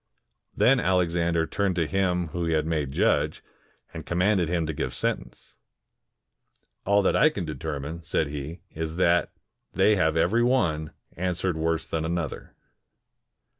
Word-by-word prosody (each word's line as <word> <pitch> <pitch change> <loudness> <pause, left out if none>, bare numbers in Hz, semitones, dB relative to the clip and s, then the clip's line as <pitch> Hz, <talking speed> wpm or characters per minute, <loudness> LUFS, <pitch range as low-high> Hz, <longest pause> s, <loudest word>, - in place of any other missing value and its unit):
Then 135 +1 +5
Alexander 85 -4 +1
turned 100 +1 -1
to 85 -1 +1
him 90 -1 0
whom 85 +1 -3
he 80 - +1
had 75 -1 +1
made 75 -4 -1
judge, - - +1 0.5
and - - -6
commanded 90 -1 +1
him 85 -2 0
to 80 - -3
give - - -3
sentence. 60 0 -4 1.3
"All 100 +1 +4
that - - +2
I 155 - +5
can 100 - -4
determine," 80 0 -5
said 80 -1 0
he, 75 +4 -6
" - - -44
is, 80 0 -4
that 85 -1 +2 0.4
they 105 -1 +4
have 80 -3 +2
ever^' 100 +9 +2
one 80 -12 +1 0.2
answered 90 0 -1
worse 80 0 -1
than 80 -1 -3
another." 85 0 -4
85 Hz, 150 wpm, -26 LUFS, 80-90 Hz, 1.3 s, Then